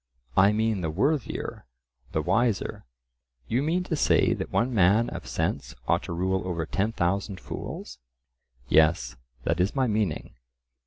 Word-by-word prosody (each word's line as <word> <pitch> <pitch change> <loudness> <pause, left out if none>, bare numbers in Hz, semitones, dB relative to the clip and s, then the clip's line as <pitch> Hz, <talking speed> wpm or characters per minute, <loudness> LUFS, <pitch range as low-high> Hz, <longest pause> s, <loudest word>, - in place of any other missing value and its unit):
"I 95 +2 +6
mean 110 -2 +1
the 80 - -1
worthier, 130 - -1 0.4
the - - 0
wiser." 115 - 0 0.6
You 120 +4 +1
mean 165 +5 +1
to 180 -3 -2
say - - +3
that - - -4
one 125 +2 +1
man 105 +3 +4
of - - -7
sense 65 - -2
ought - - +3
to - - -6
rule 95 +2 0
over 85 -3 -2
ten 100 +7 0
thousand 100 0 -1
fools? 60 - -7 0.7
"Yes, 75 -5 +3 0.3
that 85 - 0
is 95 +7 +1
my 135 -1 +2
meaning." 105 -8 -1
100 Hz, 150 wpm, -27 LUFS, 85-115 Hz, 0.7 s, I